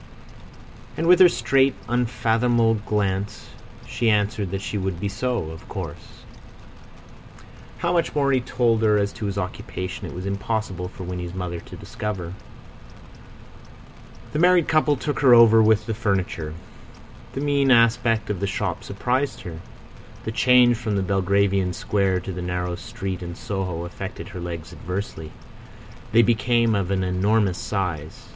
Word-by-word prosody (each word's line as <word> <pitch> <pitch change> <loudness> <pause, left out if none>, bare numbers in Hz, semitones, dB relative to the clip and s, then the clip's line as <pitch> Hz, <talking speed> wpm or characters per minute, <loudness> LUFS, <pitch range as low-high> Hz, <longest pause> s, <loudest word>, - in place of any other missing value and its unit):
And 160 - -1
with 180 +2 +6
her 185 -1 +9
straight, 135 -4 +2
unfathomable 120 -1 +2
glance 105 -1 -2 0.4
she 115 - 0
answered 105 -2 +1
that 95 +2 -4
she - - -4
would 95 -3 -2
be 100 - -2
so, 105 -5 -2
of 80 - -12
course. - - -8 1.5
How 175 0 0
much 170 -3 0
more 140 -2 +2
he 130 -2 +2
told 120 -2 +1
her 105 -1 +4
as 100 0 0
to 105 - -4
his 100 0 -4
occupation 90 0 -5
it - - -8
was 90 +1 -6
impossible 100 -2 -2
for 95 - -9
Winnie's 90 0 -5
mother 90 -2 -4
to - - -11
discover. 95 -5 -5 2.0
The 150 - 0
married 175 -1 +5
couple 155 -2 +3
took 145 +2 -3
her 130 -4 +7
over 115 -1 +7
with 110 -1 +3
the 115 - -2
furniture. 95 -8 -2 0.8
The 135 - -3
mean 140 -1 +2
aspect 115 -2 +3
of 100 - -3
the 100 - -1
shop 95 - -3
surprised 125 +7 -1
her. 80 -2 -8 0.6
The 110 - -3
change 125 0 +5
from 110 -3 -2
the 100 - 0
Belgravian 95 0 +1
square 95 -1 0
to 95 - -6
the 90 - -5
narrow 90 0 -2
street 95 -2 -5
in 85 -1 -6
Soho 90 -4 -4
affected 85 - -7
her 90 - -8
legs 85 -2 -6
adversely. 90 -4 -5 0.8
They 115 +1 +6
became 115 0 +2
of 100 -3 0
an 95 -1 0
enormous 95 +1 +1
size. 85 -7 -4
105 Hz, 150 wpm, -23 LUFS, 90-120 Hz, 2.0 s, her